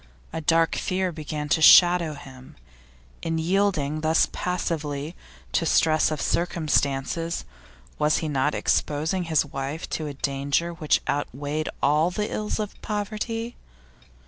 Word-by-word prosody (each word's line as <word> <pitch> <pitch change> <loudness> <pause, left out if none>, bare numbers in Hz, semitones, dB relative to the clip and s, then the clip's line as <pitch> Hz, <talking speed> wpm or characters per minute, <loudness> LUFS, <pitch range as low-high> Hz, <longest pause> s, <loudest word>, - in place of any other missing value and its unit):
A 160 - -3
dark 165 +1 +3
fear 185 0 -1
began 150 -2 -5
to 160 - +2
shadow 175 -1 +7
him. 130 -2 -13 0.7
In 165 0 -2
yielding 160 -4 0
thus 160 +1 +3
passively 160 -3 -3 0.4
to - - +1
stress 155 -1 +3
of 155 -2 -3
circumstances, 165 -1 0 0.5
was 150 0 +3
he 160 - -2
not 145 0 0
exposing 160 +5 0
his 160 -3 +2
wife 140 +3 -5
to 155 - -2
a 145 - -6
danger 140 +5 -1
which 160 -3 +1
outweighed 145 +2 -2
all 150 +4 +3
the 210 +3 -3
ills 210 0 -2
of 210 -1 -5
poverty? 215 +3 -3
160 Hz, 130 wpm, -25 LUFS, 145-175 Hz, 0.7 s, shadow